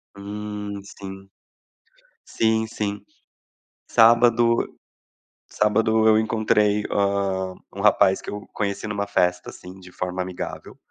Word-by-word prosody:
Hum. 105 Hz, 0 st, -6 dB
Sim, 95 Hz, -1 st, -10 dB, 1.0 s
sim, 110 Hz, 0 st, +1 dB
sim. 105 Hz, -2 st, -4 dB, 0.9 s
Sábado 115 Hz, 0 st, +4 dB, 0.8 s
sábado 110 Hz, +1 st, +2 dB
eu 110 Hz, 0 st, +5 dB
encontrei, 105 Hz, -1 st, +2 dB
hã, 100 Hz, -2 st, 0 dB, 0.2 s
um 100 Hz, -, -7 dB
rapaz 100 Hz, -2 st, +4 dB
que -, -, -13 dB
eu 105 Hz, 0 st, -6 dB
conheci 100 Hz, 0 st, -3 dB
numa 100 Hz, -1 st, -2 dB
festa, 90 Hz, -3 st, 0 dB
assim, 90 Hz, +1 st, -12 dB
de 90 Hz, 0 st, -14 dB
forma 90 Hz, 0 st, -4 dB
amigável. 90 Hz, -1 st, -6 dB
105 Hz, 110 wpm, -23 LUFS, 95-110 Hz, 1.0 s, eu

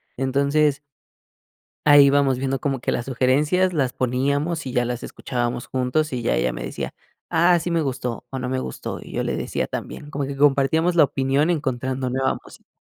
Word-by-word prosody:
entonces 140 Hz, +2 st, +1 dB, 1.1 s
ahí 145 Hz, -1 st, +9 dB
ibamos 140 Hz, -2 st, +3 dB
viendo 135 Hz, +1 st, -1 dB
como 135 Hz, -2 st, -1 dB
que -, -, -1 dB
las 120 Hz, -, -2 dB
sugerencias 145 Hz, +8 st, +2 dB
las 140 Hz, -7 st, 0 dB
poníamos 140 Hz, +6 st, -1 dB
y 130 Hz, -, -5 dB
ya 120 Hz, -, +2 dB
las 120 Hz, 0 st, -4 dB
escuchábamos 120 Hz, -1 st, -3 dB
juntos 130 Hz, +4 st, 0 dB
y 125 Hz, -2 st, -2 dB
ya 115 Hz, -, +1 dB
ella -, -, +1 dB
me -, -, -7 dB
decía: -, -, -5 dB, 0.4 s
"Ah, 175 Hz, +1 st, +4 dB
sí 175 Hz, +2 st, -3 dB
me 170 Hz, -, +2 dB
gustó 125 Hz, -4 st, -3 dB
o 135 Hz, -, -4 dB
no 125 Hz, 0 st, -3 dB
me 130 Hz, 0 st, -1 dB
gustó", 65 Hz, -, -5 dB
y -, -, -11 dB
yo -, -, -1 dB
le -, -, -2 dB
decía -, -, -2 dB
también, 145 Hz, -, -6 dB
como 145 Hz, -2 st, -3 dB
que 140 Hz, +1 st, -5 dB
compartíamos 145 Hz, +5 st, +3 dB
la 160 Hz, -3 st, +7 dB
opinión 135 Hz, +3 st, +1 dB
encontrando 130 Hz, -4 st, -1 dB
nueva 130 Hz, +1 st, 0 dB
música. -, -, -16 dB
135 Hz, 190 wpm, -23 LUFS, 125-150 Hz, 1.1 s, ahí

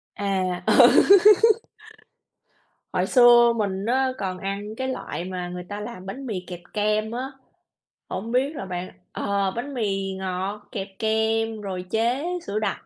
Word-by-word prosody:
À, 185 Hz, -3 st, -1 dB
ừ. -, -, +7 dB, 2.0 s
Hồi -, -, +1 dB
xưa 240 Hz, -2 st, +6 dB
mình 195 Hz, -2 st, -2 dB
á 260 Hz, +3 st, +1 dB
còn 185 Hz, -4 st, -3 dB
ăn 200 Hz, +3 st, -5 dB
cái 260 Hz, +2 st, -3 dB
loại 255 Hz, -8 st, -5 dB
mà 180 Hz, -1 st, -5 dB
người 180 Hz, 0 st, -6 dB
ta 205 Hz, +3 st, -7 dB
làm 210 Hz, -3 st, -8 dB
bánh 265 Hz, +8 st, -7 dB
mì 215 Hz, -7 st, -3 dB
kẹp 175 Hz, -1 st, -7 dB
kem 215 Hz, +1 st, 0 dB
á, 255 Hz, +3 st, -4 dB, 0.8 s
hổng 225 Hz, +4 st, -5 dB
biết 270 Hz, +5 st, +1 dB
là 195 Hz, -, -5 dB
bạn 180 Hz, 0 st, -5 dB, 0.2 s
ờ, 200 Hz, -1 st, -1 dB
bánh 280 Hz, +4 st, -5 dB
mì 195 Hz, -5 st, -2 dB
ngọt 190 Hz, +2 st, -4 dB
kẹp 195 Hz, -2 st, -4 dB
kem 220 Hz, 0 st, 0 dB
rồi 185 Hz, -2 st, -5 dB
chế 235 Hz, -, 0 dB, 0.2 s
sữa 205 Hz, +2 st, -2 dB
đặc 215 Hz, -, -3 dB
210 Hz, 155 wpm, -24 LUFS, 190-235 Hz, 2.0 s, ừ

